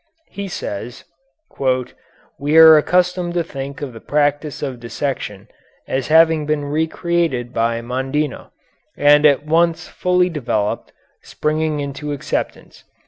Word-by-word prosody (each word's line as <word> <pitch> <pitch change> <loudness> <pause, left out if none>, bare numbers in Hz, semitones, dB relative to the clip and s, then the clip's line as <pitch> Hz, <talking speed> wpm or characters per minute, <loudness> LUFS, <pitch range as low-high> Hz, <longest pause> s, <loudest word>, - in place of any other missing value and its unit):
He 200 0 -5
says: 120 - -6 1.4
"We 145 +3 +1
are 160 -1 +10
accustomed 180 +2 +1
to 170 - +1
think 140 -2 -7
of 135 -4 -6
the 115 - -10
practice 145 +1 -1
of 130 -4 -4
dissection 115 -4 -5 0.4
as 130 -1 -2
having 160 -1 +4
been 150 -1 -1
re 155 +3 0
created 160 -9 -1
by 115 0 0
Mondino, 130 +4 -3 0.5
and 145 +1 +6
at 145 0 +2
once 165 +1 +1
fully 180 0 +1
developed, 110 -9 -2 0.3
springing 155 0 -2
into 145 +1 -5
acceptance. 140 - -5
150 Hz, 125 wpm, -19 LUFS, 130-160 Hz, 1.4 s, are